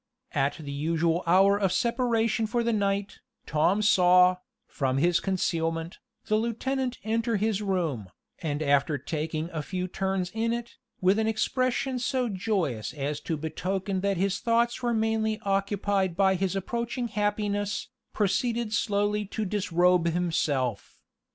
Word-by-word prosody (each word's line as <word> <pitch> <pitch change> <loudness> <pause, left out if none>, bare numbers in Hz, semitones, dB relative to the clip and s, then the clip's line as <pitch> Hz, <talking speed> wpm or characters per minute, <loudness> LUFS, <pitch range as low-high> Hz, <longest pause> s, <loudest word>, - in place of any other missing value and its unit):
At 140 -1 0
the 145 -4 -7
usual 165 +3 0
hour 195 +3 +5
of 195 -3 +1
separation 230 -2 +1
for 235 +1 0
the 235 0 +1
night, 200 -1 -1 0.3
Tom 175 +8 +2
saw, 180 -2 +5 0.3
from 135 -3 -1
his 170 +4 +3
concealment, 165 -2 -1 0.3
the 215 - +2
lieutenant 250 +3 -1
enter 225 +1 0
his 215 0 0
room, 170 - -1 0.3
and 150 -2 -2
after 145 +1 +2
taking 155 +3 -3
a 155 - -3
few 180 +3 -3
turns 190 -1 -2
in 230 +1 0
it, 235 0 -6 0.2
with 190 +3 +3
an 220 - +1
expression 255 +3 0
so 250 0 0
joyous 180 - -2
as 145 0 -3
to 160 +1 -3
betoken 185 +5 -2
that 200 -1 0
his 195 +2 0
thoughts 235 +1 +1
were 240 -1 0
mainly 220 0 0
occupied 195 -2 0
by 190 -1 +4
his 190 0 -1
approaching 235 +5 -2
happiness, 205 0 -1 0.2
proceed 225 +2 0
slowly 210 0 +1
to 215 +2 -3
disrobe 180 -3 +2
himself. 155 - -1
195 Hz, 140 wpm, -27 LUFS, 170-220 Hz, 0.3 s, hour